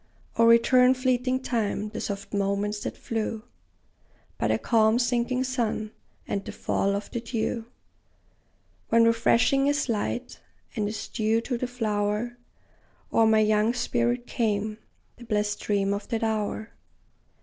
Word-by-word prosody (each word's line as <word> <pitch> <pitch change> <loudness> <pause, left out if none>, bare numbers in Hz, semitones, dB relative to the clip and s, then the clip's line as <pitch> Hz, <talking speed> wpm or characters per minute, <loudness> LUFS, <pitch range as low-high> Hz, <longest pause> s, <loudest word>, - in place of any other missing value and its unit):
O 230 - +4
return, 250 +2 +6
fleeting 255 0 0
time, 215 -4 -1
the 215 - -6
soft 200 0 -5
moments 200 +1 0
that - - -5
flew 220 -1 -3 1.0
By - - +1
the - - +2
calm 220 -1 +3
sinking 245 +1 +1
sun, 235 -4 -2 0.4
and 200 -1 -2
the - - -6
fall 200 0 0
of 200 - -5
the 235 - -3
dew, 230 0 -2 1.2
When, 230 0 +5
refreshing 235 +4 +3
as 285 -1 0
light, 230 +2 -2 0.4
and 210 -3 0
as 210 +1 -5
dew 220 +1 +1
to 245 +2 -3
the 245 +1 -2
flower 215 -1 -1 0.8
O'er 225 - +5
my 220 0 +5
young 215 +2 +2
spirit 240 0 0
came 215 -2 -1 0.4
the 240 - -12
blest 210 -2 -1
dream 200 -1 0
of 200 - -5
that 230 -2 -2
hour! 220 0 -2
225 Hz, 140 wpm, -26 LUFS, 210-240 Hz, 1.2 s, return